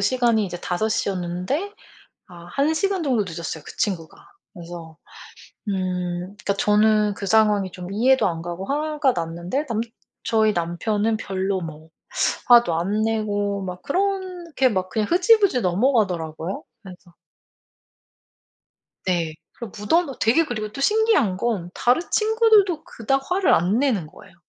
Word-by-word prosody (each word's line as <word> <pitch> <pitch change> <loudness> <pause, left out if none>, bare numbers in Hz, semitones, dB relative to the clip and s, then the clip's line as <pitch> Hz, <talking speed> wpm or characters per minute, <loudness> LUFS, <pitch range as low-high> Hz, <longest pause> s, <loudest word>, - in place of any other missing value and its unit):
시간이 230 0 +2
이제 175 -1 -7
5:00 210 +5 -1
였는데 185 - -3 0.6
아 175 -2 -13
1 280 - 0
시간 390 +1 0
정도 250 -7 +1
늦었어요 165 -3 -6
그 - - -10
친구가. 175 -7 -2 0.4
그래서 170 -3 -10 0.7
음 180 -2 -2 0.2
그러니까 205 -1 -2
저는 210 +1 +3
그 200 - -6
상황이 210 -2 +3
좀 180 +1 -8
이해도 250 +3 +3
안 165 -2 -3
가고 175 +2 -5
화가 300 0 0
났는데 170 - -3
남 230 -5 -2 0.4
저희 220 -1 +2
남편은 205 +6 -1
별로 190 -2 -2
뭐 160 -1 -9 0.6
화도 240 -8 +6
안 195 +6 0
내고 205 -2 -1
막 180 -1 -6
그렇게 360 -5 -1
막 185 -3 -2
그냥 215 +1 -1
흐지부지 370 - +4
넘어가더라고요. 180 - 0 0.2
그래서 180 -2 -14 1.9
네 170 -4 0 0.2
그리고 235 -5 -9
무던도 275 +6 +1
되게 250 +9 +3
그리고 215 -6 -4
또 275 - -7
신기한 420 - +3
건 195 -5 -2
다른 250 +7 +2
친구들도 430 -6 +3
그닥 270 +4 -1
화를 370 0 +3
안 185 +7 +2
내는 245 - +1
거예요. 175 +4 -16
210 Hz, 280 characters per minute, -23 LUFS, 180-270 Hz, 1.9 s, 화도